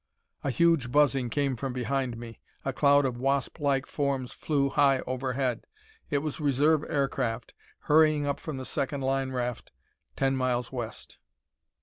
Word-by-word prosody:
A 140 - 0
huge 140 -1 +2
buzzing 135 -3 +3
came 140 +1 0
from 130 +2 -4
behind 125 0 -2
me. 115 -1 -9 0.3
A - - -1
cloud 145 0 +4
of 120 -2 -2
wasplike 135 +1 0
forms 140 -3 -2
flew 140 -3 0
high 135 -1 +3
overhead. 130 -1 -2 0.4
It 145 -2 0
was 155 -1 -3
reserve 145 +2 +3
aircraft, 135 -5 -1 0.3
hurrying 155 -1 +4
up 140 -1 -1
from 155 -4 -5
the 130 - -6
second 140 +2 -2
line 135 0 0
raft, 125 -2 -3 0.4
ten 135 0 +1
miles 125 -2 -1
west. 120 -4 -7
135 Hz, 145 wpm, -28 LUFS, 125-145 Hz, 0.4 s, cloud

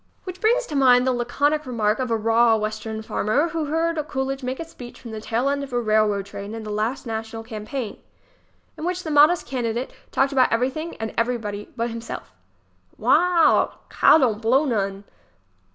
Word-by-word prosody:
Which 370 0 -8
brings 485 +3 +3
to 300 - -6
mind 250 -2 +5
the 260 - +2
laconic 285 +5 0
remark 220 -3 0
of 255 -1 -1
a 225 - +1
raw 225 +1 +4
Western 220 0 -4
farmer 255 +10 0
who 325 -1 -2
heard 325 +2 0
Coolidge 270 0 -3
make 255 +1 -4
a 330 - -4
speech 245 -7 -12
from 235 - -9
the 220 -1 -6
tail 235 +4 -1
end 280 0 0
of 275 - -8
a 245 - 0
railroad 215 -3 +1
train 200 +2 -7
in 225 - -6
the 215 - -6
last 215 +6 -2
national 225 0 -5
campaign, 225 +1 -6 0.8
in - - -6
which 360 +1 -2
the 315 - -4
modest 300 +4 +5
candidate 240 -1 -3 0.2
talked 270 +1 +2
about 260 -2 +3
everything 265 +8 -1
and 220 0 -5
everybody 225 -4 -2
but 235 +1 -1
himself: 230 0 -7 0.7
"Wa - - 0
a 355 -2 +4
al, - - +2
Cal - - +6
don't 235 -7 +1
blow 255 +6 +3
none!" 200 -6 -1
245 Hz, 190 wpm, -23 LUFS, 220-285 Hz, 0.8 s, Cal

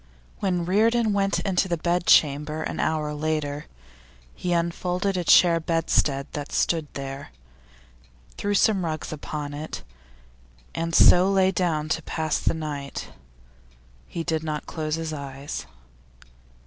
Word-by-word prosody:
When 180 -3 0
Reardon 220 +4 +3
went 195 0 +1
into 190 -1 +1
the 170 -2 -1
bedchamber 155 -3 +2
an - - -4
hour 155 -1 0
later, 150 -1 -2 0.7
he 180 - -3
unfolded 180 +3 0
a 180 - -1
chair 170 0 +6
bedstead 160 -4 +1
that 145 -1 -6
stood 165 -3 +1
there, 135 0 -6 1.1
threw 205 0 -1
some 200 -2 +3
rugs 155 -1 -3
upon 150 -1 -5
it, 150 +2 -6 0.9
and 165 0 -2
so 180 +2 +7
lay 190 -1 +4
down 165 -5 0
to 165 - 0
pass 155 0 -2
the - - 0
night. 145 -3 -5 1.0
He 165 - -4
did 160 -1 -1
not 155 -1 -3
close 155 -1 -3
his 165 -1 -4
eyes. 140 -1 -6
160 Hz, 130 wpm, -25 LUFS, 150-180 Hz, 1.1 s, so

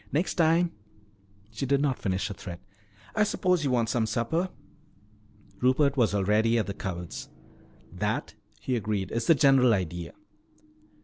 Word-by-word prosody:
Next 165 +6 0
time 170 0 +3 0.4
" 100 0 -32
she 110 +5 -4
did 140 +1 +3
not 140 -3 0
finish 95 +1 -1
her - - -4
threat. 90 -3 -8 0.6
"I 215 - +2
suppose 180 -5 +1
you 140 - +1
want 120 -3 +1
some 110 0 0
supper?" 160 +11 -1 1.1
Rupert 135 +2 +3
was 115 -6 +2
already 105 +4 +2
at 110 - +1
the 100 - -4
cupboards. 90 -3 -6 0.6
"That," - - -2 0.3
he 130 - -2
agreed, 105 -4 -2
"is 115 0 -2
the 165 - +7
general 135 -4 +5
idea." 85 -2 -4
115 Hz, 150 wpm, -27 LUFS, 100-140 Hz, 1.1 s, the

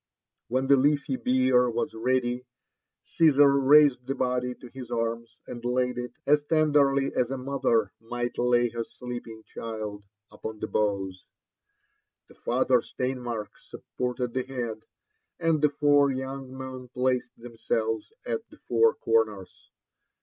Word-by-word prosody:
When 130 +3 0
the 140 +1 +5
leafy 140 0 +2
bier 125 -1 +3
was 120 +6 -2
ready, 125 +1 -1 0.6
Cnsar 145 -3 +5
raised 140 -4 +6
the 135 - -1
body 125 -1 0
Id 125 0 -10
his 130 -3 -8
arms, 115 -1 -3
and 120 -1 -8
laid 125 0 0
it, 125 0 -5
as 150 +1 +4
(en, 155 -2 +3
derly 140 -1 +3
as 125 - +1
a 135 - -3
mother 125 -6 0
might 120 +2 -4
lay 120 0 +3
her 115 0 -3
sleeping 120 -2 -8
child, 110 -3 -6 0.3
upon 110 -1 -7
the - - -2
boughs. 100 -3 -2 1.0
The - - -16
father 125 0 +1
Steinmark 125 -5 -4
supported 125 -1 -4
the 130 - 0
head, 120 -4 -5 0.5
and 165 -2 +2
the 150 - +5
four 145 -1 +4
young 130 0 -5
men 130 -1 -7
placed 125 0 -1
themselves 115 - -2
at 470 -2 -3
the - - -16
four 455 +1 +2
corners. 455 0 -1
125 Hz, 140 wpm, -27 LUFS, 120-135 Hz, 1.0 s, raised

